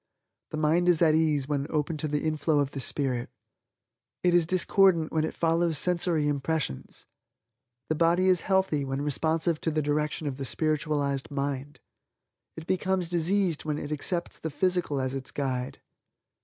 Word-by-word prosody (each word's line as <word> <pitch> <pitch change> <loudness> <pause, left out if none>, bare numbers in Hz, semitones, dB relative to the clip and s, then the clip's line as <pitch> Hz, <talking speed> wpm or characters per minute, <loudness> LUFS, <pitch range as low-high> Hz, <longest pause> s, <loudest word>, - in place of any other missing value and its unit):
The 155 - -5
mind 160 +3 +2
is 175 -1 +4
at 155 -2 +5
ease 155 -4 +2
when 145 -1 -1
open 155 +1 -1
to 155 - -2
the 150 0 -1
inflow 155 0 +1
of 140 -1 +1
the 140 - -5
Spirit. 130 -1 -2 0.9
It 180 -1 +3
is 175 -2 +4
discordant 185 -2 +3
when 160 -1 +1
it 160 - -3
follows 165 -1 +1
sensory 170 -2 +1
impressions. 145 - -3 0.8
The - - +1
body 170 +3 +3
is 185 -2 +4
healthy 190 -7 +1
when 135 +1 -3
responsive 160 +3 0
to - - 0
the 155 -1 0
direction 150 +1 -1
of 140 -3 -3
the 135 - -4
spiritualized 145 -1 -1
mind. 140 0 -4 0.8
It 160 - -7
becomes 185 -1 0
diseased 175 0 +1
when 150 -1 -2
it 145 0 -6
accepts 170 +4 -2
the 160 - -4
physical 180 -3 0
as 130 0 -2
its 135 -1 -5
guide. 130 -3 -3
155 Hz, 165 wpm, -27 LUFS, 145-170 Hz, 0.9 s, at